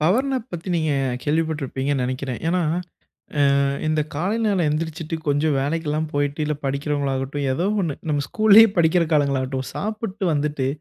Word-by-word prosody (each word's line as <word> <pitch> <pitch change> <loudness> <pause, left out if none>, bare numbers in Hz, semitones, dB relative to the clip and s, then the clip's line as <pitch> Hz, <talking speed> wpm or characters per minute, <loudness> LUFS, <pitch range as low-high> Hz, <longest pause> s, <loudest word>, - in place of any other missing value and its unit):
Power 195 - +2
nap 260 -3 -3
பத்தி 175 +1 -6
நீங்க 155 -3 +1 0.3
கேள்விப்பட்டிருப்பீங்கன்னு 145 -3 -1
நெனைக்கிறேன். 130 0 -3
ஏன்னா, 180 +2 +1 1.0
அ - - +3 0.3
இந்த 155 0 +2
காலை 180 +9 -1
நேரம் 200 -4 +2
எந்திரிசிச்சுட்டு, 160 +1 -3
கொஞ்சம் 145 0 +1
வேலைக்கெல்லாம் 155 +1 -1
போயிட்டு 145 +1 -1
இல்ல 150 - 0
படிக்கிறவங்களாகட்டும், 140 0 -2
ஏதோ 170 +6 -1 0.2
ஒண்ணு. 160 -6 -2
நம்ம 145 -1 0
ஸ்கூல்லயே 220 +1 +7
படிக்கிற 170 +1 +4
காலங்களாகட்டும், 135 -2 0
சாப்பிட்டு 215 -1 -4
வந்துட்டு 145 -2 -1
150 Hz, 140 wpm, -22 LUFS, 140-170 Hz, 1.0 s, ஸ்கூல்லயே